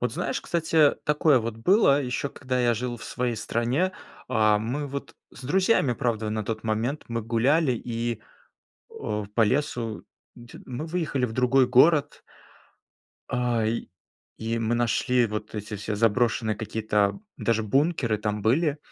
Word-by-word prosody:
Вот - - -1
знаешь, - - -2
кстати, 160 -3 +2
такое 150 -2 +4
вот 115 -1 -4
было, 145 - +4
ещё 130 +2 -3
когда 130 -1 -3
я 120 -1 +3
жил 120 +1 -3
в - - -10
своей 120 -2 -2
стране. 125 - 0 0.4
А, 110 -1 +3
мы 130 +7 -3
вот 140 0 -7 0.2
с 130 - -12
друзьями, 185 - +2
правда, 110 -2 -1
на 110 0 -2
тот 110 +1 -4
момент, 115 +7 -1
мы 115 -1 -2
гуляли 130 +6 +2
и 115 -1 -3 0.7
у 105 -1 -4
по 115 - +3
лесу 115 -2 -1 0.3
дь 120 0 -13
Мы 130 +5 -5
выехали 160 -6 -1
в 115 - -6
другой 130 +1 +3
город 145 +4 +4 1.1
а, 120 -2 0
и 115 +2 -2 0.5
и 115 +1 -2
мы 115 +1 0
нашли 120 +1 +2
вот 105 0 -5
эти 105 0 -5
все 105 +1 -4
заброшенные 115 0 +1
какие-то 105 - 0 0.2
даже 115 -1 +1
бункеры 135 0 +1
там 105 0 -2
были, 145 +7 +2
120 Hz, 150 wpm, -26 LUFS, 110-140 Hz, 1.1 s, такое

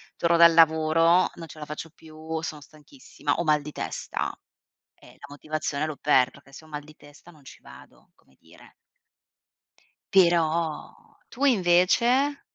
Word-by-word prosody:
torno 170 0 +1
dal 170 0 +7
lavoro, 165 +2 +3
non 165 -1 -10
ce 155 +1 -13
la 150 - -7
faccio 150 +2 -8
più, 160 0 -8
sono 155 -2 -7
stanchissima, 150 - -7
ho 170 - -2
mal 150 -2 +2
di 150 +1 -9
testa - - -5 0.6
e - - -20
la - - -12
motivazione 150 +1 -4
l'ho 155 -2 -6
per 130 -3 +2
perché 140 -1 -20
se 155 - -13
ho 155 - -18
mal 150 -1 -7
di 155 0 -16
testa 145 +4 -18
non 150 -3 -22
ci - - -14
vado, - - -17
come 65 - -31
dire. - - -20 1.4
Però 170 -3 +1 0.3
tu 280 +3 -3
invece? 240 +7 +2
160 Hz, 160 wpm, -25 LUFS, 150-170 Hz, 1.4 s, dal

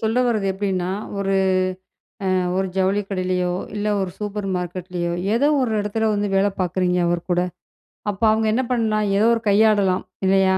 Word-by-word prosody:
சொல்ல 225 +3 +1
வரது 215 -5 0
எப்டின்னா, 190 -2 -1 0.3
ஒரு 195 0 0 1.0
அ, - - +2 0.2
ஒரு 190 - +1
ஜவுளி 190 +2 +2
கடையிலயோ, 185 -2 -1 0.2
இல்ல 210 0 -2
ஒரு 190 -1 -2
சூப்பர் 210 -1 -4
மார்க்கெட்லயோ, 175 -1 -3 0.2
ஏதோ 260 +5 +3
ஒரு 250 -3 0
இடத்துல 220 +2 -1
வந்து 205 0 0
வேல 195 +1 +3
பாக்குறீங்க 180 0 +1
அவர்கூட, 175 +1 0 0.7
அப்ப 200 0 -5
அவங்க 220 0 +1
என்ன 255 +4 +1
பண்லாம் 220 -3 +1
ஏதோ 210 - +3
ஒரு 230 - -1
கையாடலாம் 200 -3 +3 0.2
இல்லயா! 190 0 +4
195 Hz, 155 wpm, -22 LUFS, 185-215 Hz, 1.0 s, இல்லயா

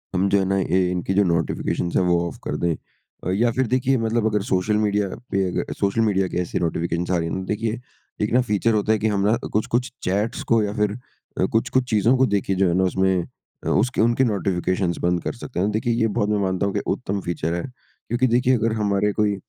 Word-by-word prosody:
हम 95 +2 +2
जो 100 - +3
है 95 - +1
ना, 95 +1 +1
इ 95 0 +1
इनकी 90 +1 -2
जो 100 +1 +4
नोटिफिकेशन्स 85 0 -1
हैं, - - +3
वो 85 -1 +2
ऑफ - - -8
कर - - -3
दें 85 -1 +1 0.5
अ, - - -1
या 115 +5 +2
फिर 130 +1 0
देखिए 130 +2 +2
मतलब 115 0 0
अगर 105 -2 +1
सोशल 95 +3 +1
मीडिया 105 -1 +1 0.2
पे 95 -1 +2
अग 90 - -3
सोशल 100 +3 +1
मीडिया 100 -4 +2
के - - -1
ऐसे 90 - -3
नोटिफिकेशन्स 85 +1 -1
आ 90 - +3
रही 85 - -1
हैं 85 - -3
ना, 95 - -3
देखिए, 110 +3 -2 0.4
एक 105 - 0
ना 125 - +5
फ़ीचर 110 0 +1
होता 105 +1 +1
है 110 - +3
कि 110 - +1
हम 100 - 0
ना 110 - +4 0.2
कुछ-कुछ 120 +4 -1
चैट्स 105 +5 -1
को 115 -1 +5
या 105 0 -2
फिर 105 -1 +1
अ, 125 -6 -5
कुछ-कुछ 125 +5 0
चीज़ों 110 +3 +3
को 130 - +4
देखिए 95 -1 0
जो 95 0 +3
है 85 - +1
ना 95 - +3
उसमें 95 -1 +1 0.4
अ, - - 0
उसके 120 +4 +1
उनके 120 +3 +3
नोटिफिकेशन्स 95 -4 0
बंद 90 -1 +1
कर - - -2
सकते 120 -4 -6
हैं। 100 +3 +1
देखिए, 110 +2 0
ये 115 -1 +2
बहुत 105 -1 -1
मैं 105 - +1
मानता 95 0 0
हूँ 100 - -1
कि - - 0 0.2
उत्तम 100 +1 -3
फ़ीचर 85 -1 -2
है 85 - -2 0.4
क्योंकि 120 +3 +1
देखिए 125 +1 +3
अगर 115 0 0
हमारे 100 0 +1
कोई 105 -1 +1
100 Hz, 240 wpm, -23 LUFS, 95-115 Hz, 0.5 s, ना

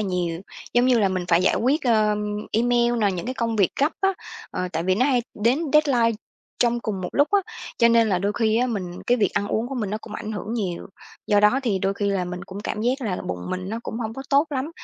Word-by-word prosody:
nhiều, 180 -4 -2 0.3
giống 245 +1 +4
như 250 -2 +4
là, 200 - +3
mình 185 -1 -2
phải 170 +1 +4
giải - - +3
quyết, 280 +7 +1
ơm, 210 -2 +2 0.2
email 240 +1 +2
nè, 205 -2 +3
những 175 +2 -5
cái 255 - -3
công 230 -2 -1
việc 195 -4 +3
gấp 295 +3 +3
á, 390 0 +3 0.4
ờ, 180 - -3
tại 160 - -1
vì 185 +2 +2
nó 245 +7 +2
hay 250 -4 +2
đến 235 +6 +2
deadline 245 -7 +3 0.4
trong 240 0 +2
cùng 205 -4 -3
một 180 - -3
lúc 285 +1 +3
á. 405 - +5 0.4
Cho 235 - +6
nên 230 -1 +4
là 185 -3 +2
đôi 200 +2 0
khi 220 -1 +2
á, 250 +2 +2
mình 185 -6 -4
cái 245 - +4
việc 205 - +2
ăn 205 0 0
uống 230 +3 -1
của 270 - -5
mình 215 -6 -2
nó 215 - -2
cũng 215 - -10
ảnh 215 0 -5
hưởng 215 +2 -4
nhiều, 185 -7 -3 0.4
do 205 0 +4
đó 210 +6 +4
thì 205 -6 0
đôi 195 +1 0
khi 200 0 -1
là 190 -2 0
mình 180 0 -6
cũng 195 +2 -8
cảm 210 - -4
giác 250 +4 0
là 205 -8 -2
bụng 90 0 -5
mình 185 +1 -4
nó 225 +2 -3
cũng 225 - -5
hông 220 -1 -3
có 270 - -6
tốt 280 +3 +4
lắm, 280 +2 -2
215 Hz, 265 wpm, -23 LUFS, 195-240 Hz, 0.4 s, Cho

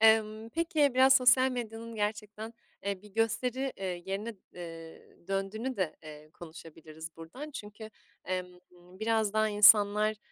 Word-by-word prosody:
Emm, 220 0 +4
peki, 310 -3 +1
biraz 265 +1 +7
sosyal 255 0 +5
medyanın 230 -2 -6
gerçekten, 210 +1 -4 0.3
eee, 200 -1 -3
bir 210 - -14
gösteri, 250 +4 0
eee, 180 -2 -4
yerine, 210 +4 -4 0.2
eee, 165 -2 -10
döndüğünü 215 +6 -2
de, 185 -5 -2
eee, 155 -1 -12
konuşabiliriz 160 -1 -11
buradan. 245 - -9
Çünkü, 215 -4 -9 0.3
emm, 185 0 -2 0.3
biraz 200 +5 -2
daha 215 0 +2
insanlar, 210 +1 +6
215 Hz, 130 wpm, -30 LUFS, 185-230 Hz, 0.3 s, biraz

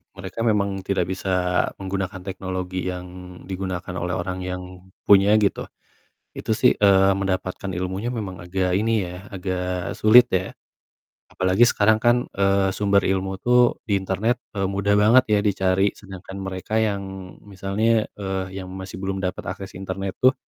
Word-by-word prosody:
mereka 95 +3 -8
memang 100 -3 +1
tidak 95 -2 -1
bisa 90 -1 0
menggunakan 95 -1 -4
teknologi 95 -1 -4
yang 90 0 -4 0.4
digunakan 95 -1 -5
oleh 90 +1 -2
orang 95 +1 -3
yang 90 0 -4 0.4
punya, 100 +1 +6
gitu. 105 -2 +1 0.7
Itu - - -4
sih, 110 - +4
eee, 95 -1 +5
mendapatkan 95 0 -2
ilmunya 95 +6 -3
memang 95 -7 -5
agak 90 0 0
ini 110 -1 +1
ya, 90 +2 -9
agak 90 -2 -3
sulit 120 +3 +7
ya. 95 -3 -1 0.8
Apalagi 95 +6 +3
sekarang 110 +1 +3
kan, 120 +1 +3
eee, 100 0 +2
sumber 100 -1 +2
ilmu 95 0 -1
tuh 125 0 +4
di 105 - -1
internet, 100 +6 0 0.2
eee, 95 - +1
mudah 100 +1 +1
banget 115 +5 +6
ya - - +2
dicari, 95 0 +2
sedangkan 95 -1 -10
mereka 95 +3 -2
yang 95 -3 -4
misalnya, 105 +3 0
eee, 95 -1 -4
yang 95 -1 -7
masih 95 -1 -7
belum 95 0 -3
dapat 90 0 -3
akses 95 -1 -9
internet 95 0 -5
tuh 130 +1 +5
95 Hz, 150 wpm, -23 LUFS, 95-100 Hz, 0.8 s, sulit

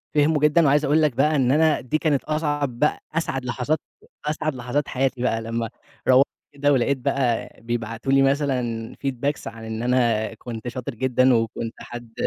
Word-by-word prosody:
فهموا 150 0 +3
جدًا، 150 +2 +4
وعايز 145 +1 +4
أقول 150 +3 +3
لك 150 -4 +2
بقى 150 +4 +3
إن 130 -3 +3
أنا 155 +1 +3
دي 130 +5 0
كانت 150 -4 +1
أصعب 145 -5 -1
بقى 150 - +2
أسعد 135 -5 -2
لحظات 125 +5 -1 0.5
أسعد 155 -1 -1
لحظات 125 +4 -2
حياتي 130 -1 -1
بقى 115 -3 +1
لمّا 115 0 -3 0.4
روّحت 130 +2 +6 0.3
كده 145 0 +2
ولقيت 135 +1 +2
بقى 130 -3 0
بيبعتوا 115 +2 -3
لي 135 0 +5
مثلًا 130 -5 0
feedbacks 140 +2 -2
عن 115 0 -8
إن 110 +1 -4
أنا 120 -3 +1
كنت 115 -1 -7
شاطر 125 +1 -5
جدًا، 130 +1 +3
وكنت 115 0 -1
حد 120 -1 -9
130 Hz, 170 wpm, -23 LUFS, 120-145 Hz, 0.5 s, روّحت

